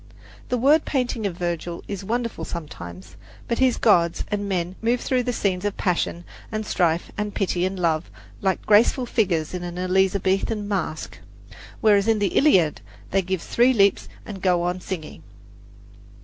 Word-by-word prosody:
The 250 - +1
word 290 +6 +4
painting 245 -5 -1
of 175 -3 -6
Virgil 175 -1 -3
is 200 -1 -5
wonderful 230 +3 -2
sometimes; 95 - -8 0.3
but 235 - -1
his 260 -2 +3
gods 170 -6 +3
and 205 -1 -2
men 180 -1 -2
move 235 +2 +1
through 255 0 0
the 245 0 -1
scenes 195 -5 -1
of 205 -1 -2
passion 175 -1 -1 0.3
and 215 -1 -3
strife 170 -4 0
and 210 -1 -3
pity 185 -2 0
and 190 0 -5
love 165 -2 0 0.3
like 190 -1 0
the - - -22
graceful 225 +4 +4
figures 180 -10 0
in 180 - -3
an 175 0 -6
Elizabethan 190 +3 +1
mask, 185 -6 -3 0.6
whereas 205 -1 +4
in 225 -1 +3
the 205 -1 -1
Iliad 185 - +4 0.3
they 195 - +3
give 185 -1 -3
three 245 +2 +3
leaps 200 -4 +3 0.2
and 195 -3 -8
go 180 -2 +2
on 180 +1 -2
singing. 170 -5 -6
195 Hz, 165 wpm, -23 LUFS, 175-220 Hz, 0.6 s, word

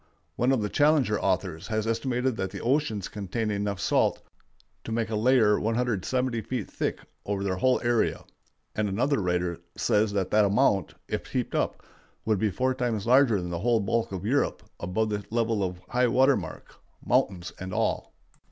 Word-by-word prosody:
One 125 +3 +2
of 125 -5 +1
the 105 - -1
Challenger 145 -7 +3
authors 90 -4 -1
has 110 -1 -1
estimated 125 +2 0
that 95 -3 -2
the - - -7
oceans 120 -7 0
contain 105 +2 -3
enough 100 -1 -2
salt - - +1 0.6
to - - -6
make 115 0 -1
a - - 0
layer 110 -2 +4
170 120 +1 0
feet 115 -1 -4
thick - - -2 0.2
over 100 -1 -2
their 95 -2 -1
whole 130 +7 +3
area, 120 -1 +1 0.5
and 105 -1 -1
another 120 +6 +1
writer 90 -2 -1 0.2
says 105 0 +2
that 95 -2 -1
the 105 0 +5
amount, 100 - +2
if - - -3
heaped - - -2
up, - - -1 0.4
would 110 -3 +1
be 110 - +2
four 130 +7 0
times 120 -5 -2
larger 125 -3 +5
than 90 -1 -5
the 85 - -2
whole 115 +3 +2
bulk 115 +3 0
of 95 0 -5
Europe 140 +6 0 0.2
above 110 +5 -1
the 105 -1 -2
level 115 -2 0
of 90 -1 -3
high 125 +3 +2
water 130 +3 +4
mark, - - -7 0.3
mountains 90 -2 +1
and 95 0 -6
all. - - -1
110 Hz, 180 wpm, -27 LUFS, 100-125 Hz, 0.6 s, the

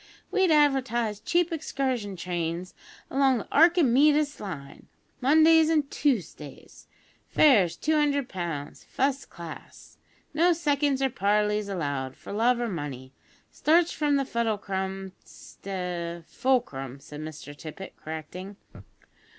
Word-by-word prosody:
we'd 380 -2 +3
advertise 260 -8 +2
cheap 345 - +1
excursion 260 -9 -2
trains 175 0 -4 0.4
along 270 -1 +3
the 215 - -6
Arkimeedis 300 -2 +4
Line, 145 -9 -8 0.3
Mondays 315 +4 +5
an' 315 -2 +3
Toosdays. 185 - -3 0.4
Fares, 215 - +4
two 315 - 0
hundred 285 -3 +1
pounds, 170 -6 -5
fust 275 +1 -1
class. 170 -2 -11 0.3
No 345 +3 +4
seconds 285 -4 +1
or 265 - +1
parleys 210 0 +1
allowed 140 -8 -3
for - - -9
love 235 +3 +2
or 240 - -1
money. 140 - -6 0.4
Starts 330 +2 +3
from 295 -2 +1
the 275 -1 +1
Fuddlecrum 195 -5 -2
Sta 175 -3 -6
" - - -33
"Fulcrum," 140 - -1
said 150 +2 -10
Mr 155 -2 -8
Tippet, 160 +6 -9
correcting. 160 +5 -8
215 Hz, 120 wpm, -27 LUFS, 170-285 Hz, 0.4 s, Mondays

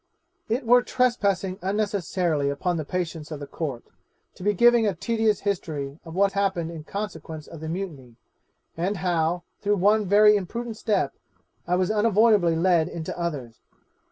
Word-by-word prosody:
'It 240 +4 -1
were 245 +2 +6
trespassing 200 -8 0
unnecessarily 185 -7 0
upon 175 +5 -1
the 160 - -2
patience 165 -2 -4
of 155 -3 -6
the 145 - -6
Court, 140 -5 -5 0.5
to - - -16
be 205 +3 +2
giving 235 +2 +5
a 195 - 0
tedious 225 -2 0
history 155 -7 -3
of 165 0 -9
what 195 +1 +3
happened 190 -4 -1
in 160 -2 -8
consequence 160 -5 -6
of 165 - -11
the 160 +1 -6
mutiny, 160 -10 -6 0.6
and 185 +5 -1
how, 175 -1 0 0.2
through 205 0 +2
one 205 +2 +3
very 210 +2 +6
imprudent 230 +4 -3
step, 205 - 0 0.5
I 180 - +2
was 185 +2 +1
unavoidably 210 -5 +4
led 170 -1 +3
into 165 -2 -5
others. 145 -10 -5
185 Hz, 155 wpm, -25 LUFS, 160-210 Hz, 0.6 s, were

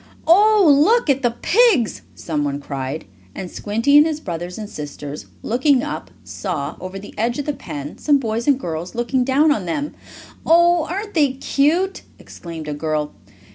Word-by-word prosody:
"Oh, 410 +4 +5 0.2
look 450 -4 +3
at 270 0 0
the 240 -3 0
pigs!" 425 - +3
someone 145 -3 -2
cried, 140 +1 -5 0.3
and 180 - -6
Squinty, 230 +8 +3
and 300 - +5
his 310 -2 -3
brothers 175 - -5
and 215 -1 -6
sisters, 145 -3 -7 0.2
looking 260 +2 +2
up, 300 - -5
saw, 155 -6 -4
over 185 +1 -7
the 200 +1 -10
edge 235 +2 0
of 290 - -3
the 295 - -1
pen, 145 - -8
some 290 -1 +3
boys 230 -2 -3
and 280 -2 +4
girls 170 -3 -5
looking 240 +2 0
down 280 +4 +3
on 210 -10 0
them. 285 - -3 0.5
"Oh, 345 0 +4
aren't 405 +5 -5
they 290 -5 +3
cute!" 310 +8 +1 0.2
exclaimed 165 -3 -9
a 150 - -3
girl. 150 0 -2
240 Hz, 170 wpm, -20 LUFS, -, 0.5 s, Oh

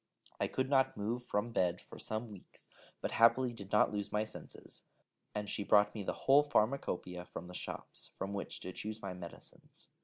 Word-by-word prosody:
I - - +2
could 130 0 0
not 135 -4 +3
move 110 +4 -1
from 115 0 -1
bed 90 -5 +2
for - - -12
some 110 +1 -3
weeks, 100 -3 -14 0.3
but - - -1
happily 120 +2 +5
did 100 -3 -9
not 105 - +5
lose 105 -1 -2
my 105 0 +2
senses, 110 - -9 0.5
and 105 0 -2
she 100 - -1
brought 105 0 +5
me 110 - -4
the 95 - -1
whole 140 +2 +8
pharmacopoeia 105 -10 0
from 90 - -7
the 90 - -9
shops, - - -6
from 100 +1 -3
which 100 - -3
to 90 - -4
choose 110 +3 -5
my 95 -2 -3
medicines. 90 -2 -10
105 Hz, 190 wpm, -35 LUFS, 100-120 Hz, 0.5 s, whole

